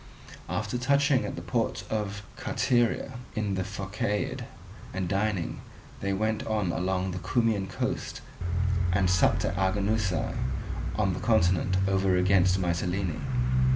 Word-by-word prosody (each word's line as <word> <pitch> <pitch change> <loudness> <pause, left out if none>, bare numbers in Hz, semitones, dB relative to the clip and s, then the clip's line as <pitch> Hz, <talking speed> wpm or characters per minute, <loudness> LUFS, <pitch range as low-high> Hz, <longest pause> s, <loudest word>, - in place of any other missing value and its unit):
After 125 - -1
touching 140 +1 +3
at - - -4
the - - -6
port - - -1
of 105 -1 -2
Carteria, 120 0 +1 0.2
in 105 -2 0
the 95 -1 0
Phocaeid, 105 +2 -2 0.5
and 95 -2 -1
dining, 100 -1 -1 0.4
they 100 - -1
went 110 +2 0
on 105 -5 +1
along 95 +1 0
the 90 - -4
Cumaean 110 0 +1
coast 95 - -3 0.7
and 90 0 +3
supped 90 -1 +3
at - - -1
Arginusae, 100 0 +1 0.6
on - - +1
the - - -3
continent 90 +2 +3
over 95 -1 +3
against 90 0 +4
Mitylene. 90 0 -1
95 Hz, 125 wpm, -28 LUFS, 90-110 Hz, 0.7 s, against